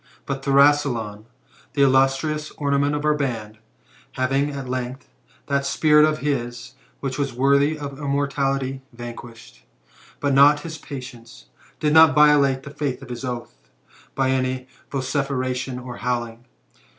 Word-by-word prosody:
But 135 -1 -4
Thrasyleon, 135 -7 +2 0.5
the 140 - +3
illustrious 135 +3 +2
ornament 140 0 +1
of 145 0 -3
our 150 - +4
ban'd, 115 -7 -4 0.5
having, 135 +3 0
at 140 -2 -6
length, 130 +1 -4 0.4
that 140 -1 0
spirit 150 +2 +4
of 155 0 0
his 120 -3 -3 0.3
which 135 0 -3
was 140 -2 -1
worthy 140 +4 +3
of 140 -2 -7
immortality 140 -2 -1
van 120 -1 -8
quished, 115 - -13 0.6
but 140 -1 0
not 145 +2 +6
his 160 -1 -7
patience, 125 -5 -10 0.3
did 150 -1 +1
not 160 -3 +7
violate 145 -3 +4
the 140 - -9
faith 145 -3 -3
of 130 - -12
his 120 +2 -6
oath, 120 -2 -5 0.6
by 130 -1 +1
any 130 -1 -1 0.2
vociferation 130 -2 -2
or 125 -1 -8
howling. 120 -1 -3
135 Hz, 140 wpm, -22 LUFS, 125-145 Hz, 0.6 s, not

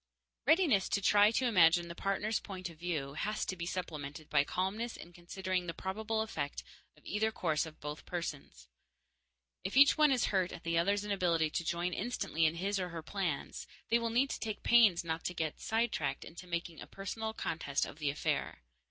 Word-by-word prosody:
Readiness 315 - +4
to - - +1
try 205 +1 +5
to 240 +3 +1
imagine 175 -6 +5
the 170 - -6
partner's 195 +4 -1
point 185 -3 -6
of 160 - -17
view 155 -6 -2
has 210 +8 -2
to 185 - -3
be 170 -1 -5
supplemented 155 -4 -5
by 140 -2 +5
calmness 195 +9 -2
in 175 - -11
considering 180 +1 -3
the 170 - -4
probable 220 +3 -2
effect 145 -10 -3 0.3
of - - -23
either 220 +2 0
course 155 -6 0
on 155 - -11
both 150 +1 -6
persons. 145 - -6 1.0
If 190 +7 -2
each 285 +3 +7
one 300 -2 +6
is 255 -3 +3
hurt 185 -2 +2
at - - -9
the 165 0 -1
other's 200 +5 +2
inability 175 -6 +1
to 170 - -1
join 175 +2 -1
instantly 165 -9 0
in 160 - -1
his, 195 +3 -1
or 180 -1 -2
her, 165 -2 -6
plans, 175 -5 -3 0.2
they 235 - +4
will 230 0 -1
need 255 +4 +2
to - - -3
take 215 -2 -4
pains 220 -8 +6
not 165 -1 -3
to 180 - -2
get 160 -2 -2
sidetracked 225 +1 -1
into 175 +2 -10
making 170 -1 -4
a - - -8
personal 220 +3 -5
contest 145 -7 -1
of - - -10
the 150 -2 0
affair. 140 - -2
180 Hz, 195 wpm, -33 LUFS, 165-215 Hz, 1.0 s, each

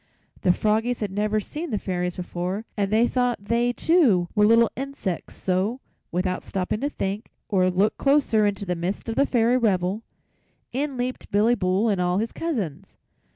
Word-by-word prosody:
The 180 - +4
froggies 220 +5 +1
had 205 -3 -2
never 210 +2 0
seen 305 - -6
the 215 - -1
Fairies 180 -2 -2
before 180 +4 -4
and 200 -1 -1
they 225 +3 +4
thought 245 -2 +1
they, 235 +3 +2
too, 245 - +3
were 210 -1 +4
little 230 +1 +5
insects, 265 -10 -4
so, 190 +7 -1 0.3
without 180 +1 -1
stopping 190 +2 -2
to 285 - 0
think 205 -4 -4 0.2
or 185 -3 +3
look 195 +4 +1
closer 275 -7 +3
into 200 0 -2
the 180 - -1
midst 180 +6 -3
of 225 - -2
the 280 - +3
Fairy 240 0 +3
revel, 195 -3 +1 0.7
in 275 +1 -2
leaped 250 +1 -3
Billy 215 +4 +3
Bull 190 0 +1
and 200 -4 +1
all 180 0 +1
his 225 +3 -1
cousins. 200 - -4
210 Hz, 175 wpm, -24 LUFS, 185-240 Hz, 0.7 s, little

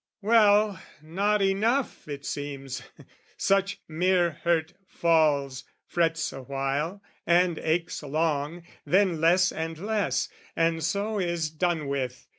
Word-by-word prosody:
Well, 210 -2 +4 0.2
not 200 +6 +1
enough, 220 - 0
it 140 -1 -6
seems: 140 -2 -5 0.6
such 195 0 +1
mere 175 +2 +2
hurt 170 -1 +1
falls, 145 -6 +1 0.2
Frets 165 -1 0
awhile, 140 +8 -3 0.2
and 175 -1 +3
aches 165 +2 -1
long, 155 +2 -1 0.2
then 185 -4 +2
less 180 +3 +4
and 160 0 -4
less, 210 +3 -1 0.3
And 165 -1 +1
so 205 +1 -1
is 170 -4 -1
done 160 -2 -1
with. 130 -2 -3
165 Hz, 110 wpm, -27 LUFS, 150-195 Hz, 0.6 s, Well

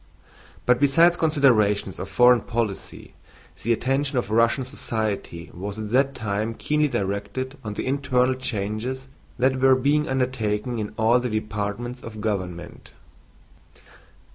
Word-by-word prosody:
But 125 0 +4
besides 165 +5 +5
considerations 120 - +2
of 95 - -5
foreign 125 -1 +5
policy, 115 -4 -4 0.5
the 115 - 0
attention 135 +4 0
of 120 -4 -1
Russian 115 +4 +2
society 110 - -4
was 100 +3 -6
at 110 -1 -5
that 135 +2 +2
time 110 -1 -2
keenly 150 +4 +1
directed 105 +5 -3
on 105 -2 -5
the - - -3
internal 130 -2 +1
changes 125 +2 -3 0.3
that 130 +1 +2
were 135 0 +6
being 145 +3 +1
undertaken 125 -3 -1
in 105 0 -5
all 115 +3 +4
the 125 0 -2
departments 110 +3 -3
of 110 -2 -9
government. 95 -5 -4
120 Hz, 130 wpm, -24 LUFS, 105-130 Hz, 0.5 s, were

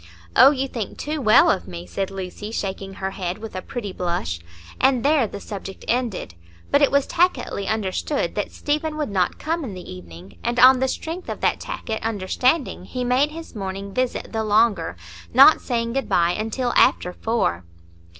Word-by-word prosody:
"Oh, 270 - +9
you 270 -1 -1
think 230 -6 -5
too 300 0 -3
well 215 -4 +6
of 85 - -2
me," 85 -1 -7
said 190 - -3
Lucy, 195 +2 -6
shaking 195 -2 -4
her 190 0 -3
head, 180 -2 -4
with 220 -1 -9
a 185 - -3
pretty 205 -2 -6
blush, 170 - -2 0.4
and 260 -1 +3
there 290 -5 +4
the 200 - -8
subject 195 -1 -8
ended. 235 - -1 0.4
But 285 - +4
it 285 - +5
was 280 0 +2
tacitly 345 - 0
understood 215 - -1
that 205 - -3
Stephen 305 +1 -2
would 300 -8 -2
not 185 -3 0
come 330 +1 -2
in 215 -8 -6
the 180 - -8
evening; 90 0 -12
and 240 +1 0
on 255 0 +8
the 265 - +1
strength 330 +6 -5
of - - -5
that - - +1
tacit 220 -1 -5
understanding 225 - 0
he 250 +5 -4
made 255 +4 +2
his 325 +2 -9
morning 195 0 -5
visit 255 +1 -2
the 220 -1 -1
longer, 210 - +2 0.4
not 315 - +8
saying 230 -2 -2
good 270 -2 -2
bye 170 0 +3
until 225 +5 -2
after 180 - +4
four. 200 - -1
220 Hz, 185 wpm, -23 LUFS, 190-265 Hz, 0.4 s, Oh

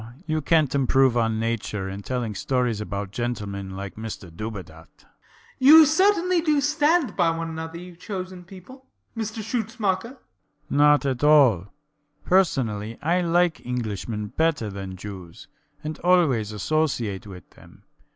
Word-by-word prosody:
You 155 -1 -1
cant 155 -2 +2
improve 135 -2 +3
on 115 -2 +1
Nature 110 -3 -2
in 95 +1 -6
telling 120 -1 -3
stories 120 +1 -1
about 100 -1 -5
gentlemen 100 -5 -4
like 100 0 -6
Mr 105 -6 -8
Dubedat. 90 -6 -8
BLENKINSOP. - - -29 0.5
You 310 +4 +9
certainly 365 +2 +3
do 305 -3 +2
stand 300 +1 +2
by 175 -3 +3
one 165 0 -3
another, 160 +1 -6
you 180 0 -10
chosen 185 -1 -7
people, 200 +9 -14 0.3
Mr 220 -1 -4
Schutzmacher. 225 0 -2
SCHUTZMACHER. - - -30 0.5
Not 145 0 +4
at 130 -1 -2
all. 135 - +5 0.6
Personally, 115 - +1
I 175 +4 +2
like 175 0 +1
Englishmen 110 -3 -4
better 155 -9 0
than 95 -1 -7
Jews, 95 -3 -10 0.4
and 155 0 -5
always 155 - +2
associate 110 -4 -1
with 90 -4 -11
them. - - -19
140 Hz, 140 wpm, -24 LUFS, -, 0.6 s, You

